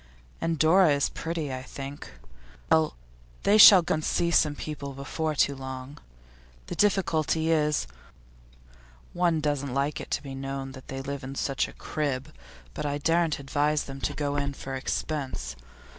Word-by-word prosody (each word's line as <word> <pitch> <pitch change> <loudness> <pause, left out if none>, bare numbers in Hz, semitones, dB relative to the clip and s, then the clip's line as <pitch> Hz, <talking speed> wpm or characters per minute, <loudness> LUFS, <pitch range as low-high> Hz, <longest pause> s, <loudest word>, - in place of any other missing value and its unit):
And 165 0 0
Dora 160 +1 +5
is 140 -1 +1
pretty, 160 -4 -4
I 130 - -4
think. 135 +2 -8 0.6
Well, 80 -5 +3 0.5
they 210 +2 +5
shall 190 -4 +11
go - - 0
and 155 - -2
see 170 +2 +1
some 150 -3 +3
people 145 -2 -6
before 150 +3 -3
long. 130 0 -7 0.7
The - - -6
difficulty 165 -5 +1
is, 150 - +2 1.3
one 170 -3 +1
doesn't 140 -3 -1
like 140 +2 0
it - - -9
to - - -2
be 135 -2 -7
known 135 0 -5
that 130 -1 -12
they 135 0 -5
live 140 0 -5
in 135 +1 -6
such 135 0 0
a - - -12
crib; 140 -4 -3 0.4
but - - -5
I 145 -1 -1
daren't 165 +1 +1
advise 145 +2 0
them 135 0 -9
to - - -2
go 145 -1 -1
in 140 -1 -2
for 135 - -7
expense. 130 - -3
145 Hz, 160 wpm, -27 LUFS, 135-160 Hz, 1.3 s, shall